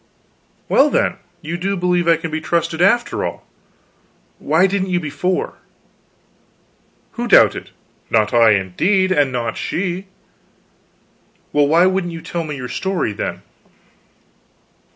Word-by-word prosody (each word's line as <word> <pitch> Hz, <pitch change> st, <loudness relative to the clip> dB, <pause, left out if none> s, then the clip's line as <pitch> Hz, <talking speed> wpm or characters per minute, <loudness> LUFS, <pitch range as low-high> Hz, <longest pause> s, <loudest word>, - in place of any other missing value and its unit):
"Well, 285 Hz, +2 st, +4 dB
then 195 Hz, -, 0 dB, 0.3 s
you 165 Hz, +3 st, -4 dB
do 195 Hz, +3 st, -2 dB
believe 180 Hz, -1 st, 0 dB
I 165 Hz, -1 st, +5 dB
can 165 Hz, 0 st, -6 dB
be 155 Hz, 0 st, -3 dB
trusted, 165 Hz, 0 st, -1 dB
after 235 Hz, +6 st, +2 dB
all. -, -, -5 dB, 0.9 s
Why 160 Hz, +5 st, +2 dB
didn't 190 Hz, -1 st, -1 dB
you 180 Hz, -1 st, +1 dB
before?" 175 Hz, +4 st, -3 dB, 1.5 s
"Who -, -, -4 dB
doubted? -, -, +4 dB, 0.4 s
Not 110 Hz, -1 st, +1 dB
I, 115 Hz, -2 st, +5 dB
indeed; 180 Hz, -, +1 dB
and 145 Hz, -7 st, +2 dB
not 120 Hz, -2 st, -3 dB
she." 185 Hz, +1 st, -3 dB, 1.5 s
"Well, 145 Hz, -1 st, +3 dB
why 165 Hz, +4 st, +4 dB
wouldn't 185 Hz, -2 st, 0 dB
you 165 Hz, -, -8 dB
tell 170 Hz, -1 st, -4 dB
me 150 Hz, -2 st, -5 dB
your 125 Hz, -1 st, -6 dB
story, 180 Hz, -, -2 dB
then?" -, -, -5 dB
170 Hz, 130 wpm, -18 LUFS, 145-185 Hz, 1.5 s, I